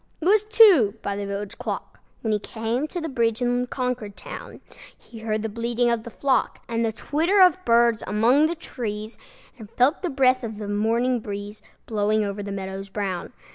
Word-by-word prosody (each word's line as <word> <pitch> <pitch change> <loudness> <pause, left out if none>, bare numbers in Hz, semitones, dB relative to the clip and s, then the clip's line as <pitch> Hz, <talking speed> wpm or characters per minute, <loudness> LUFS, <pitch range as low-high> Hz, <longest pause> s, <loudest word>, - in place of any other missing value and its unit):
It 315 - -6
was 410 +3 +5
two 400 - +6
by 200 - -2
the 200 0 -4
village 200 0 -5
clock, - - -5 0.2
When 220 -2 0
he 210 - +1
came 225 +7 -3
to 350 - -5
the 325 - -3
bridge 235 -5 0
in 245 0 0
Concord 250 -6 -3
town. - - -9 0.4
He 230 - -13
heard 220 -1 -2
the - - -1
bleating 235 +2 0
of 235 -1 0
the 235 - -9
flock, 270 +3 0
And 230 -1 -1
the 225 - +1
twitter 325 - 0
of 370 0 +5
birds 235 -1 +4
among 240 +9 +4
the 340 - -3
trees, 220 -8 -6 0.4
And 215 -2 -10
felt 255 +8 +2
the 360 - -1
breath 260 -2 +3
of 220 -2 -5
the 210 -1 -6
morning 230 +4 +1
breeze 205 0 -7 0.2
Blowing 215 0 +1
over 200 0 -3
the 200 0 -5
meadows 195 0 -5
brown. 190 -3 -3
230 Hz, 195 wpm, -24 LUFS, 210-255 Hz, 0.4 s, two